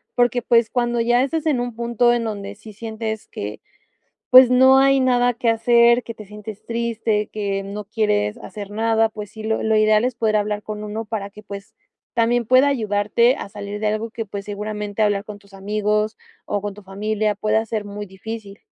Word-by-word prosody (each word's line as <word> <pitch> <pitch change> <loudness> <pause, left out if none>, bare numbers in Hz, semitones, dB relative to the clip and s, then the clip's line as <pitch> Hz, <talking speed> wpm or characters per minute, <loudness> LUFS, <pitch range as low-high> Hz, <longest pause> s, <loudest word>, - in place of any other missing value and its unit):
porque, 245 0 +2
pues, 235 -2 +3
cuando 240 -1 0
ya 240 +2 +3
estás 315 +3 -2
en 285 -5 +2
un 245 0 -3
punto 235 +1 +2
en 240 -1 0
donde 200 -2 -5
sí 215 +1 -13
sientes 220 0 -5
que, 105 +1 -7 0.7
pues, 255 -1 +9
no 260 +1 +6
hay 275 0 +4
nada 245 -1 +3
que 235 0 +1
hacer, 235 +1 +4
que 230 - -8
te 215 - -11
sientes 210 0 -10
triste, 230 -2 -1
que 200 -2 -2
no 205 +2 -6
quieres 210 0 0
hacer 205 -3 -8
nada. 225 +1 +2
Pues 210 -2 -8
sí, 215 0 -10
lo 220 0 0
lo 220 0 +2
ideal 215 +1 +4
es 250 -1 -1
poder 220 -2 0
hablar 210 0 -1
con 210 -1 -6
uno 215 +2 -4
para 205 -2 -5
que, 210 +1 -14
pues, 200 0 -9 0.4
también 235 0 +2
pueda 255 +4 +5
ayudarte 225 0 +2
a - - -7
salir 205 0 -6
de 215 - +1
algo 215 +2 -2
que, 225 0 -5
pues, 200 0 -7
seguramente 210 0 -4
hablar 205 -1 +1
con 210 -1 -9
tus 200 0 -23
amigos 210 +2 -1 0.3
o 205 -1 -2
con 205 - -3
tu 210 - -13
familia 210 +2 -1
pueda 215 +2 0
ser 220 -1 -3
muy 205 0 -7
difícil. 200 +1 -8
215 Hz, 200 wpm, -21 LUFS, 205-235 Hz, 0.7 s, pues